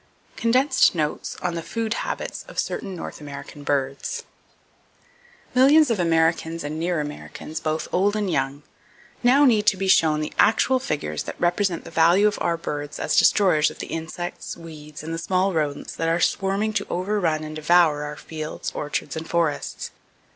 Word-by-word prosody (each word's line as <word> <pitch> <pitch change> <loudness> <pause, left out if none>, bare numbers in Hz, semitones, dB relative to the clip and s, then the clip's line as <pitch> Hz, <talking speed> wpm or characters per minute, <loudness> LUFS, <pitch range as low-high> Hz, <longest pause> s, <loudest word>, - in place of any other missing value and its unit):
Condensed 255 -1 +3
Notes 155 -2 -2
On 180 - 0
The 170 - -3
Food 225 +5 -2
Habits - - -4
Of - - -12
Certain 195 - -2
North 165 - -7
American 145 0 -9
Birds. 140 -1 -2 1.3
Millions 275 +2 +6
of 220 - 0
Americans 165 -1 +1
and 150 +2 -4
near 170 0 0
Americans, 150 +1 -6
both 155 0 -2
old 200 +3 +2
and 210 -2 0
young, 140 -3 -1 0.6
now 265 +4 +5
need 215 -5 +3
to 195 - +4
be 195 +1 -2
shown 155 -4 +4
the 155 - -4
actual 255 +4 +4
figures 145 - -3
that - - -7
represent 175 0 +1
the 165 - -11
value 170 +5 +4
of 210 - -1
our 170 - +1
birds 145 -3 -5
as - - 0
destroyers 180 -7 +4
of - - -12
the - - -7
insects, 165 +2 -5
weeds 155 -3 -10
and 165 +1 -5
the 165 - -3
small 185 +2 +1
rodents 150 -3 -2
that 165 - -1
are 165 +1 +2
swarming 195 +4 +1
to - - -1
overrun 180 -4 0
and 155 0 -6
devour 155 -1 +4
our 150 0 -5
fields, 155 -1 -6
orchards 150 +2 -3
and 160 0 -6
forests. 165 -4 -1
165 Hz, 170 wpm, -24 LUFS, 155-195 Hz, 1.3 s, Millions